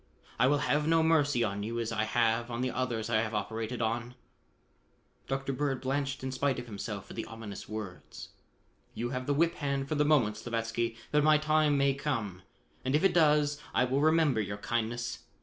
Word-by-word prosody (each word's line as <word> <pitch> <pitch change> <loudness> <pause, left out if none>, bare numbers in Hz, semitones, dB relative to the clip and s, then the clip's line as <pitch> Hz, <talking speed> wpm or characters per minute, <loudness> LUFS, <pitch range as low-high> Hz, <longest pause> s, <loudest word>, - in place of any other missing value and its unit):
I 125 - +5
will 145 +2 +4
have 150 +1 +1
no 165 0 +4
mercy 145 -6 +3
on 100 -2 -2
you 115 +3 -3
as 115 -1 -2
I 110 -1 0
have 115 +1 +1
on 120 0 -3
the 130 0 0
others 120 -4 -2
I 110 -2 +2
have 110 -1 -3
operated 110 +3 -3
on." 120 +2 -2 1.1
Dr. 135 0 -2
Bird 135 -1 -1
blanched 135 0 -2
in 130 - -2
spite 135 +1 0
of 120 - -5
himself 100 -2 -6
at - - -9
the 115 - -4
ominous 115 -4 -8
words. 105 -4 -7 0.7
"You 120 +1 -3
have 125 -1 -4
the 145 - +2
whip 170 +3 +3
hand 140 -1 -1
for 155 - -2
the 150 -1 +3
moment, 130 -9 +3
Slavatsky, 115 0 -2
but 150 0 +3
my 155 0 +6
time 155 -1 +2
may 140 0 +3
come 115 -10 -3 0.4
and 130 +2 +1
if 150 - +2
it 195 - +4
does, 150 -3 +3
I - - +4
will 130 +3 +1
remember 155 -6 +3
your 100 0 -4
kindness. 120 +2 -2
125 Hz, 200 wpm, -30 LUFS, 115-145 Hz, 1.1 s, my